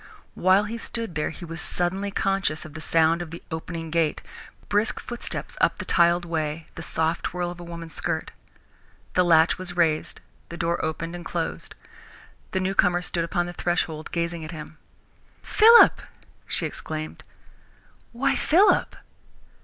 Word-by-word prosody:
While 185 +3 +4
he 225 +2 -5
stood 230 -5 -4
there 150 -1 -1
he 175 - -9
was 165 0 -6
suddenly 190 +3 0
conscious 195 -6 0
of 155 - -10
the 155 - -8
sound 165 +1 +3
of 175 - -6
the 165 +1 -9
opening 165 0 -5
gate, 165 -2 0 0.4
brisk 205 +2 +1
footsteps 240 -1 -5
up - - +3
the - - -6
tiled 170 0 +3
way, 160 -1 -3
the - - -8
soft 160 +1 -1
swirl 175 0 -3
of 175 - -10
a - - -8
woman's 170 -2 -8
skirt. - - -2 0.8
The 180 - +4
latch 165 -1 +4
was 180 -1 -6
raised, 160 -3 +1 0.3
the 170 - -7
door 170 0 -1
opened 160 +2 -3
and 175 - -7
closed. - - -4 0.7
The 190 - -1
newcomer 185 -2 +2
stood 170 -1 -1
upon 175 +1 -1
the 175 - -6
threshold, 165 -3 -2
gazing 170 -1 -2
at 155 - -7
him. 155 -1 -9 0.6
"Philip!" 460 +2 +7 0.5
she - - 0
exclaimed. 155 0 -6 0.9
"Why, 270 +4 +1
Philip!" 370 +7 +3
170 Hz, 155 wpm, -25 LUFS, 160-185 Hz, 0.9 s, Philip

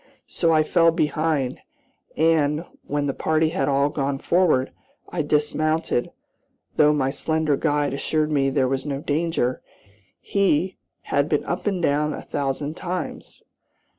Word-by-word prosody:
So 165 - 0
I 155 -1 +4
fell 165 +1 +4
behind, 155 -4 0 0.6
and, 155 0 +2 0.2
when 145 0 -1
the 140 - -1
party 160 +2 +1
had 135 -3 -1
all 140 +1 +2
gone 140 -1 -2
forward, 160 -5 +2 0.4
I 175 - -2
dismounted, 150 -2 0 0.7
though 150 -1 +5
my 135 -3 +1
slender 155 +1 0
guide 145 0 0
assured 155 +2 0
me 135 -2 +2
there 135 -1 +1
was 135 0 -1
no 140 -2 -3
danger, 150 -5 -1 0.6
he 190 -2 +1 0.4
"had - - +2
been - - +1
up - - -3
and 190 -4 -1
down 150 0 +1
a - - -7
thousand 145 +2 -3
times." 180 0 -5
150 Hz, 140 wpm, -23 LUFS, 140-160 Hz, 0.7 s, though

